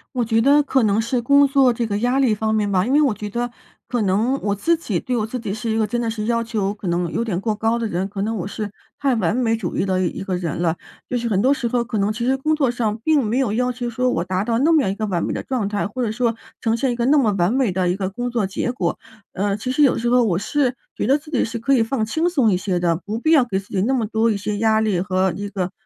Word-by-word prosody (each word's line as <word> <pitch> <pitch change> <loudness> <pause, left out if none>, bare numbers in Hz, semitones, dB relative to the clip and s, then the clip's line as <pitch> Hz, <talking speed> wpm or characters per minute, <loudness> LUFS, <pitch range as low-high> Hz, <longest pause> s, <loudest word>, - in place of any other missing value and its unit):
我 245 -2 +1
觉 225 0 +2
得 285 +4 +5
可 270 -3 +1
能 210 0 +2
是 240 +2 -1
工 280 +3 +5
作 270 -2 +4
这 235 -1 -2
个 205 -1 -1
压 245 +4 +1
力 250 -6 +3
方 220 +1 -1
面 210 -2 +1
吧。 185 -1 +2
因 250 - -1
为 295 +2 +5
我 275 -6 +3
觉 210 0 -6
得， 240 +3 -2 0.4
可 245 -2 -1
能 210 +6 +1
我 205 - 0
自 330 +12 +1
己 220 - -2
对 250 - -3
我 220 -3 0
自 250 +3 -5
己 215 -4 -4
是 220 +1 -3
一 220 - 0
个 220 -1 +1
真 240 +2 -1
的 230 - -1
是 215 -1 -4
要 230 0 +1
求 215 -4 -2
可 205 -3 -8
能 175 0 0
有 225 - 0
点 200 -7 -2
过 215 +2 -1
高 225 +2 0
的 230 - -1
人。 185 +1 -2
可 195 0 -5
能 225 +2 -1
我 185 -5 -3
是 205 +1 -4 0.3
太 275 -3 +1
完 200 -4 +1
美 225 -3 +2
主 210 -6 -4
义 - - +1
的 185 -1 0
一 175 - -3
个 190 -1 -2
人 175 -4 -3
了。 170 -1 0 0.3
就 250 - 0
是 235 -1 -2
很 195 -3 +1
多 265 +5 +4
时 270 - -4
候， 240 0 +1
可 225 -2 -3
能 200 +1 +1
其 235 +2 -3
实 260 +2 +2
工 305 +4 0
作 290 -4 +2
上， 225 -3 -1
并 310 -3 +3
没 225 +3 -1
有 250 -6 +1
要 250 +2 +1
求 245 -1 -4
说， 250 +2 0
我 - - 0
达 185 +1 -1
到 230 +1 0
那 315 +5 +3
么 310 - +5
样 190 - 0
一 - - -4
个 215 - -2
完 180 -5 -1
美 - - -2
的 - - -3
状 240 -7 -2
态， 205 -1 -1
或 250 +4 -4
者 220 - -1
说 230 0 0 0.2
呈 225 -1 0
现 255 +2 0
一 - - -2
个 235 - 0
那 290 +4 +4
么 230 -7 +3
完 175 +5 +2
美 260 -5 +1
的 180 0 0
一 180 - +1
个 190 -1 -2
工 245 +5 -4
作 235 -4 0
结 195 +5 -2
果。 175 -8 -2 0.3
呃， 200 +1 -1
其 235 +5 -3
实 280 +4 +1
有 275 - +4
时 235 +1 -1
候 250 +1 +4
我 175 -6 +1
是， 255 +4 0 0.2
觉 - - -2
得 275 +3 +4
自 300 +1 -14
己 260 - +1
是 230 +1 -5
可 235 +5 +1
以 250 - +4
放 225 -1 -1
轻 320 +10 0
松 270 -11 +2
一 180 - +2
些 180 -1 -1
的， 170 -2 +2
不 210 +2 -3
必 315 +7 +1
要 285 -6 +5
给 195 -6 -2
自 195 +1 -7
己 190 - -1
那 255 +5 +1
么 245 -4 +1
多 220 +1 +1
一 215 - +1
些 205 +1 -3
压 220 0 +2
力 210 -5 +1
和 185 0 0
一 205 +2 -4
个， 185 -3 -3
225 Hz, 340 characters per minute, -21 LUFS, 200-250 Hz, 0.4 s, 得